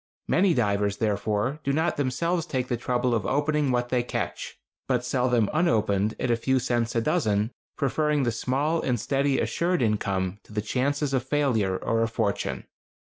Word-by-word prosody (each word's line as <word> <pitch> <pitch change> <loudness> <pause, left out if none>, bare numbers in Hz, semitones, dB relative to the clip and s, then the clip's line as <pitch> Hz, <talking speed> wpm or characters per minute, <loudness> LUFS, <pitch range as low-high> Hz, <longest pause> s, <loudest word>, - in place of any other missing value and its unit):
Many 180 -2 +3
divers, 100 -3 +1
therefore, 110 +5 -1
do 140 - 0
not 160 +4 +1
themselves 165 +5 -1
take 130 -4 -2
the 120 - +1
trouble 120 +1 0
of 110 -3 +1
opening 150 0 +1
what 120 -1 0
they 125 -1 +2
catch, 120 - -4 0.3
but 125 -2 0
sell 125 0 +1
them 120 -4 +3
unopened 110 - +1
at 125 - 0
a - - +4
few 130 +3 +1
cents 120 -2 0
a 115 - +2
dozen, 105 0 +1 0.3
preferring 150 0 +1
the 120 - +1
small 140 +8 0
and 125 -3 0
steady 135 +4 +1
assured 175 -3 0
income 100 -3 -1
to - - -16
the 105 - -1
chances 140 +5 0
of 130 - +2
failure 125 -9 +1
or 115 +3 0
a 115 - +2
fortune. 110 -3 -2
125 Hz, 175 wpm, -26 LUFS, 110-140 Hz, 0.3 s, a